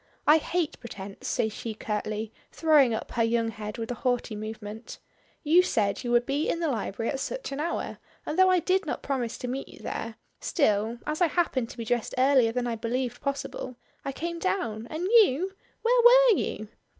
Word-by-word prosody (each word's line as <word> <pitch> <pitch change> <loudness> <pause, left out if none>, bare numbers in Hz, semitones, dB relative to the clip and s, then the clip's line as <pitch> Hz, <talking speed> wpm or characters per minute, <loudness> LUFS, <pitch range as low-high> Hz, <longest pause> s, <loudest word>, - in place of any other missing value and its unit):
"I 300 - +7
hate 330 0 -2
pretence," 200 -4 -8
says 220 -1 0
she 220 0 -5
curtly, 215 +1 -3 0.2
throwing 300 -6 +4
up 220 - -4
her 235 - +1
young 230 0 +1
head 210 -1 -6
with 230 +1 -4
a 240 - -6
haughty 245 -4 0
movement. 215 +1 -7 0.5
"You 330 +4 +6
said 205 - 0
you 240 - -3
would 240 0 +3
be 285 +4 0
in 335 - 0
the 330 -2 0
library 225 -1 -2
at 270 - -3
such - - -4
an 275 - -4
hour, 330 +3 -3 0.3
and - - -3
though 375 0 +7
I 370 - +5
did 375 +3 +1
not - - -3
promise 250 -4 -2
to 250 - -5
meet 265 +2 -4
you - - -14
there, 225 0 -5 0.2
still, 225 - +1
as 305 +3 -3
I 350 - +6
happened 290 -8 0
to - - -11
be 230 - -4
dressed 240 0 -1
earlier 260 -3 +4
than 245 +1 -1
I 235 -1 -1
believed 240 +3 -3
possible, 275 -2 -4 0.3
I 275 - -3
came 335 +5 -4
down, 235 - -2
and 315 +3 -4
you? 385 - +4 0.3
Where 485 +1 +4
were - - +7
you?" 215 - -3
250 Hz, 200 wpm, -27 LUFS, 225-325 Hz, 0.5 s, I